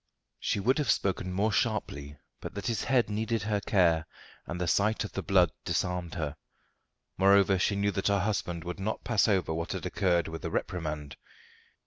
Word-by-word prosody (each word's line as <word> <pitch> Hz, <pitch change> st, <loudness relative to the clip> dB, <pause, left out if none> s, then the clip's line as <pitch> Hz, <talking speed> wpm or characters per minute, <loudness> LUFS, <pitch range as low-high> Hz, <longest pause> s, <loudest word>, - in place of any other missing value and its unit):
She -, -, 0 dB
would 130 Hz, +9 st, +2 dB
have 150 Hz, -, 0 dB
spoken 95 Hz, -1 st, +1 dB
more 100 Hz, +4 st, +1 dB
sharply 75 Hz, -11 st, -1 dB, 0.2 s
but -, -, -8 dB
that 100 Hz, -, -5 dB
his 115 Hz, -2 st, -1 dB
head 125 Hz, -3 st, +3 dB
needed 110 Hz, 0 st, -1 dB
her 105 Hz, -1 st, 0 dB
care 85 Hz, -6 st, +2 dB, 0.4 s
and 85 Hz, -, -4 dB
the 90 Hz, -, 0 dB
sight 105 Hz, +6 st, +2 dB
of 105 Hz, -, -6 dB
the -, -, -3 dB
blood 90 Hz, -4 st, +3 dB
disarmed 90 Hz, -2 st, -2 dB
her. 75 Hz, -4 st, -3 dB, 0.8 s
Moreover, 95 Hz, 0 st, +5 dB
she 100 Hz, -, +1 dB
knew 100 Hz, +1 st, +1 dB
that 95 Hz, 0 st, -1 dB
her 100 Hz, -1 st, +2 dB
husband 90 Hz, -5 st, -2 dB
would 90 Hz, +2 st, -5 dB
not 105 Hz, +3 st, -3 dB
pass 115 Hz, -3 st, +2 dB
over 95 Hz, -6 st, +1 dB
what 85 Hz, +1 st, -3 dB
had -, -, -5 dB
occurred 85 Hz, -3 st, +1 dB
with 80 Hz, 0 st, -7 dB
a -, -, -2 dB
reprimand. 75 Hz, -5 st, -3 dB
95 Hz, 185 wpm, -29 LUFS, 85-105 Hz, 0.8 s, Moreover